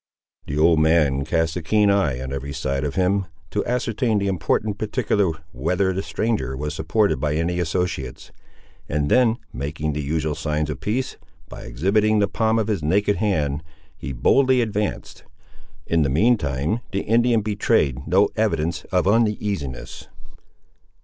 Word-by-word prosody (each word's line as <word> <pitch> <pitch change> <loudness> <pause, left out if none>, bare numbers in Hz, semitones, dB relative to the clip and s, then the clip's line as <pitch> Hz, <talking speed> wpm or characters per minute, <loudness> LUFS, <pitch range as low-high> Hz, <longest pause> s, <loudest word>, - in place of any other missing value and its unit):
The 70 - -3
old 80 +1 +4
man 75 -4 +3
cast 80 +1 0
a 90 - -3
keen 105 +5 +3
eye 95 -11 +1
on 65 +1 -5
every 70 +1 -5
side 70 +1 -2
of 75 -2 -3
him, 95 +1 +1 0.2
to 105 - 0
ascertain 115 -2 0
the 100 -1 0
important 100 +4 -1
particular 105 -4 0 0.2
whether 90 +9 0
the 95 - -2
stranger 100 - -2
was 75 +1 -3
supported 80 - +1
by 75 +1 0
any 85 +2 -1
associates, 85 -6 -3 0.6
and 75 -1 0
then 120 -2 +4 0.2
making 75 +3 -3
the 75 - -2
usual 75 +1 -1
signs 75 0 -2
of 70 - -6
peace, 125 +5 -2 0.3
by - - -9
exhibiting 100 - +1
the 100 -1 +3
palm 110 +2 +1
of 110 -2 0
his 105 -6 -1
naked 100 +7 +1
hand, 75 -9 0 0.3
he 70 - -6
boldly 130 - +3
advanced. 105 -3 -3 0.6
In 85 -1 +1
the 70 - +2
mean 110 - +4
time, 70 - -2
the 100 - -1
Indian 115 +1 +2
betrayed 100 - 0
no 100 +3 +4
evidence 85 -7 -1
of 90 0 0
uneasiness. 100 - -1
90 Hz, 155 wpm, -22 LUFS, 75-105 Hz, 0.6 s, old